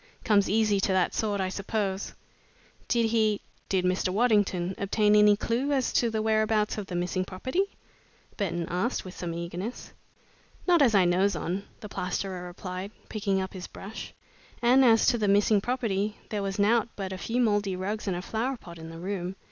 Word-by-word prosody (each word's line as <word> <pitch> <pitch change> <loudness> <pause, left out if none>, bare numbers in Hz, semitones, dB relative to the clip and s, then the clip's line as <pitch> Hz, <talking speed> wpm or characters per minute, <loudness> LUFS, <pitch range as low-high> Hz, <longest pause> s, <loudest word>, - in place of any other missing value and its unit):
Comes 205 -2 +3
easy 210 -1 +3
to 195 - +1
that 185 -1 +2
sort, 205 -2 -1
I 190 -1 0
suppose." 195 0 -3 0.7
"Did 230 -2 +2
he 215 -2 +2 0.3
did 185 -2 +1
Mr. 185 0 +1
Waddington 200 -4 +2
obtain 210 +1 +3
any 210 0 +6
clue 240 +6 -1
as 265 -3 0
to 235 - +3
the 220 -1 -1
whereabouts 215 -1 +1
of 200 - -6
the 180 - -5
missing 180 +1 -1
property?" 260 - -1 0.7
Burton 175 -4 -2
asked, 185 +8 -1
with 185 - -9
some 175 -1 -4
eagerness. 175 +7 -5 0.7
"Not 350 -3 +5
as 240 -6 +5
I 190 -2 +5
knows 185 +3 +2
on," 190 +4 -3 0.2
the 210 - -6
plasterer 185 -1 -3
replied, 185 +2 -6 0.2
picking 200 -3 0
up 190 0 -4
his 185 -1 -7
brush, 205 +3 -8 0.5
"and 250 +3 +5
as 225 -3 +5
to 240 - +3
the 210 - +1
missing 205 +1 +4
property, 215 -4 -1
there 210 -2 -2
was 195 -1 -3
nowt 220 +3 +3
but 190 -2 -4
a - - -5
few 235 +5 -1
mouldy 205 -5 +2
rugs 205 +4 -3
and 185 -2 0
a 180 - -5
flower 245 +6 -2
pot 170 -6 -12
in 160 0 -8
the 165 - -9
room. 185 +1 -4
200 Hz, 190 wpm, -28 LUFS, 185-220 Hz, 0.7 s, any